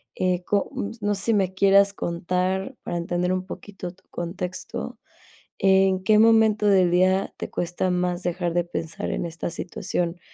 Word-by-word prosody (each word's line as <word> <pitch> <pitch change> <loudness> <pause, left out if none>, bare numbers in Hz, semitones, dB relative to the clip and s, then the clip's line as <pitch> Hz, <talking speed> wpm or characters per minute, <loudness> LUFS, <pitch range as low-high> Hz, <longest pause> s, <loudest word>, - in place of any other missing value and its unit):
eh, 180 -1 0
co 200 -1 0
mm, 200 - -3
s 225 - -13
No 205 0 +1
sé 195 - -3
si 230 - +2
me 190 -3 +1
quieras 200 +1 +5
contar 185 +5 -2
para 175 - -4
entender 175 +1 -1
un 185 0 -2
poquito 190 -2 -8
tu 185 +1 -26
contexto. 180 +1 -5 0.6
¿En 190 -1 +3
qué 215 +1 +4
momento 220 -2 +5
del 185 -3 +4
día 185 +2 +2
te - - -5
cuesta 175 +2 -2
más 180 0 0
dejar 175 -1 -1
de 175 0 +2
pensar 165 -2 -4
en - - -2
esta 170 0 -4
situación? 175 -1 -3
185 Hz, 175 wpm, -24 LUFS, 175-200 Hz, 0.6 s, quieras